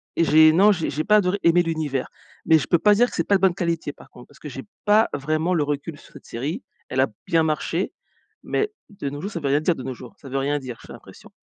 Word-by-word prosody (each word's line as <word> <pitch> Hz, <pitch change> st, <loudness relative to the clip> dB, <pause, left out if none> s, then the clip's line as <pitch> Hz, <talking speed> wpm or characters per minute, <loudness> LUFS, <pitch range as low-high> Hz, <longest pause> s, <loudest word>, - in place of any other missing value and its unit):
et 165 Hz, -, +2 dB
j'ai 155 Hz, 0 st, +6 dB
non, 200 Hz, +5 st, +6 dB
j'ai 175 Hz, -5 st, -1 dB
j'ai 150 Hz, +2 st, -2 dB
pas 210 Hz, +4 st, +4 dB
adoré 200 Hz, 0 st, +1 dB
aimer 170 Hz, +1 st, +4 dB
l'univers 155 Hz, -5 st, -2 dB, 0.4 s
mais 160 Hz, -1 st, +6 dB
je 130 Hz, -, -3 dB
peux 170 Hz, -, +4 dB
pas 210 Hz, +3 st, +5 dB
dire 245 Hz, +4 st, +3 dB
que -, -, -9 dB
c'est -, -, 0 dB
pas 200 Hz, -, +4 dB
de 190 Hz, -, +1 dB
bonne 190 Hz, -2 st, +4 dB
qualité, 170 Hz, -4 st, -2 dB
par -, -, -18 dB
contre, 125 Hz, -, -15 dB
parce 145 Hz, -, -21 dB
que -, -, -9 dB
j'ai 135 Hz, 0 st, -8 dB, 0.2 s
pas 215 Hz, +2 st, +4 dB
vraiment 155 Hz, +5 st, -1 dB
le 160 Hz, -, +2 dB
recul 145 Hz, +1 st, -4 dB
sur -, -, -19 dB
cette -, -, -14 dB
série. 150 Hz, -, -5 dB, 0.2 s
Elle 130 Hz, -, -3 dB
a 135 Hz, -, +3 dB, 0.2 s
bien 165 Hz, -1 st, +3 dB
marché 160 Hz, +3 st, -1 dB, 0.5 s
mais 425 Hz, 0 st, -1 dB, 0.2 s
de 195 Hz, -9 st, -5 dB
nos 145 Hz, +1 st, -7 dB
jours, 200 Hz, -, -5 dB
ça 170 Hz, -, -4 dB
veut 140 Hz, -, -2 dB
rien 140 Hz, +2 st, +3 dB
dire 170 Hz, +2 st, +1 dB
de 130 Hz, -, -8 dB
nos 130 Hz, +1 st, -4 dB
jours, 125 Hz, -1 st, -13 dB
ça 135 Hz, -, -12 dB
veut 135 Hz, -, -2 dB
rien 145 Hz, +2 st, 0 dB
dire, 125 Hz, -4 st, -8 dB
j'ai -, -, -10 dB
l'impression, -, -, -14 dB
160 Hz, 280 wpm, -23 LUFS, 140-180 Hz, 0.5 s, j'ai